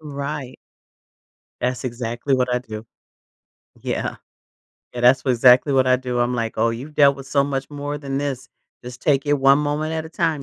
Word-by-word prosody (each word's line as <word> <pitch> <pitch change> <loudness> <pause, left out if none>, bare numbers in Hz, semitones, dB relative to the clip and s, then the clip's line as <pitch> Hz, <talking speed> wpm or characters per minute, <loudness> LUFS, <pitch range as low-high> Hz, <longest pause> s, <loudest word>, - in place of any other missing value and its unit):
Right. 140 -3 -6 1.0
That's 125 +1 -2
exactly 120 +2 -2
what 125 -1 0
I 125 - +2
do. 110 -2 -9 1.0
Yeah. - - -3 0.8
Yeah, 120 - -4
that's 125 +2 +5
wha 130 - +1
exactly 125 +3 +5
what 130 -1 +3
I 130 - +4
do, 125 -1 -4
I'm 120 +1 +1
like, 115 -2 -2
"Oh, 115 +1 +2
you've 130 +7 -7
dealt 140 -2 +5
with 135 -1 -10
so 140 0 +2
much 135 -1 -3
more 145 0 -5
than 140 -2 -4
this, 135 -2 -3 0.3
just 125 0 -10
take 140 -1 +2
it 145 - +3
one 135 0 +4
moment 150 +2 -2
at 160 0 -3
a - - -10
time, 160 -3 -1
135 Hz, 190 wpm, -21 LUFS, 125-145 Hz, 1.0 s, that's